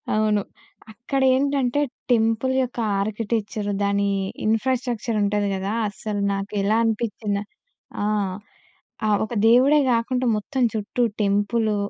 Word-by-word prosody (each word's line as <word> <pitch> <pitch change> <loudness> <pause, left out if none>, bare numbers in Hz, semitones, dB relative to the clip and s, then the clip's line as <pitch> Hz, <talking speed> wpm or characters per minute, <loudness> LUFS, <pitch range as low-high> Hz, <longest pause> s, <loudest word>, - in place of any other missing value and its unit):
అవును. 215 -1 +2 0.5
అక్కడేంటంటే 265 +2 +1 0.3
టెంపుల్ 225 +2 +2
యొక్క 245 -1 -5 0.2
ఆర్కిటెక్చరు 215 0 -2
దాని 200 0 +1 0.4
ఇన్‌ఫ్రాస్ట్రక్చర్ 235 0 0
ఉంటది 205 0 +1
కదా! 195 +2 -3 0.2
అసలు 205 0 -4
నాకు 195 0 -4
ఎలా 215 +3 +2
అనిపిచ్చిందా 215 -2 -1 0.6
ఆ! - - 0 1.0
ఆ - - +2 0.2
ఒక 220 - -8
దేవుడే 260 +6 +6
కాకుండా 250 +2 0
మొత్తం 255 +5 -2
చుట్టూ 220 +3 -3 0.2
టెంపులు, 210 +2 +1
220 Hz, 105 wpm, -23 LUFS, 205-245 Hz, 1.0 s, దేవుడే